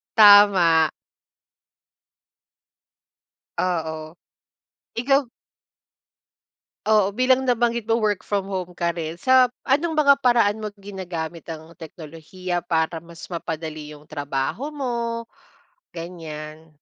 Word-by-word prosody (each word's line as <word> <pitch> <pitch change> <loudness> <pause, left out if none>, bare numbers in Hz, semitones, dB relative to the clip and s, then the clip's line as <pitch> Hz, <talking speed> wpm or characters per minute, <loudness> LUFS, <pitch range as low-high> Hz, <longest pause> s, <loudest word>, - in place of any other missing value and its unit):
Tama. 200 -7 +7 2.7
Oo. 160 -2 -2 0.8
Ikaw 275 +3 +2 1.7
Oo, 205 -2 +3
bilang 255 +2 +2
nabanggit 235 -2 +1
mo 225 0 +1
work 210 -2 0
from 200 -1 -2
home 180 -2 -4
ka 170 0 -1
rin, 165 -1 -4
sa 255 +8 +4 0.2
anong 315 +5 +2
mga 280 -2 +5
paraan 240 -5 +3
mo 215 -1 -6
ginagamit 180 -5 -7
ang 165 0 -9
teknolohiya 170 +2 -6
para 160 0 0
mas 170 +1 -12
mapadali 155 -3 -5
yung 150 +1 -16
trabaho 145 - -3
mo, 235 -4 -3 0.7
ganyan? 160 -2 -8
185 Hz, 95 wpm, -23 LUFS, 160-230 Hz, 2.7 s, Tama